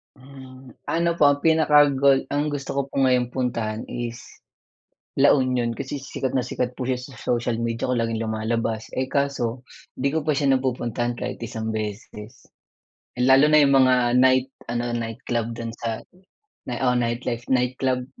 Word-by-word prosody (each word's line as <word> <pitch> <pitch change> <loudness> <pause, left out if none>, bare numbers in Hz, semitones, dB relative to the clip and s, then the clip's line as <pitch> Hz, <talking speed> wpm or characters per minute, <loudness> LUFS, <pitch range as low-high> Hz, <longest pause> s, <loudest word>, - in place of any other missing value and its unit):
Hmm, 130 -1 -13 0.2
ano 170 +1 +1
po, 145 - +7
ang 145 0 +2
pinaka 155 -2 +5
goal 135 0 +3
ang 145 +1 0
gusto 145 -2 -4
ko - - +3
po - - -15
ngayong 125 -2 +2
puntahan 115 -4 -2
is 120 -1 -5 0.9
La 140 +1 +5
Union 125 -3 0
kasi 140 +1 -5
sikat 130 -1 -4
na 130 - +3
sikat 125 0 -3
po 125 -1 -5
siya 130 - +1
sa 125 +2 -10
social 120 -1 -1
media 115 0 -2
ko, 125 - -1
laging 115 -1 -1
lumalabas. 110 0 -2
Eh, 130 - 0
kaso 130 -4 -1 0.3
di 140 - -1
ko 160 0 -2
pa 155 - +2
siya 140 -2 +2
napupuntahan 120 -2 -2
kahit 125 +1 -5
isang 110 -1 -5
beses. 105 0 -7 0.7
Lalo 130 +4 +5
na 155 0 +6
yung 140 -1 +4
mga 130 -1 +5 0.3
night 130 0 +4 0.2
ano, 120 0 -2
nightclub 115 0 -3
dun 115 -1 -5
sa 115 -1 -5 0.7
oo, 125 +1 +1
nightlife 120 0 -2
nightclub, 125 0 0
125 Hz, 160 wpm, -23 LUFS, 115-135 Hz, 0.9 s, po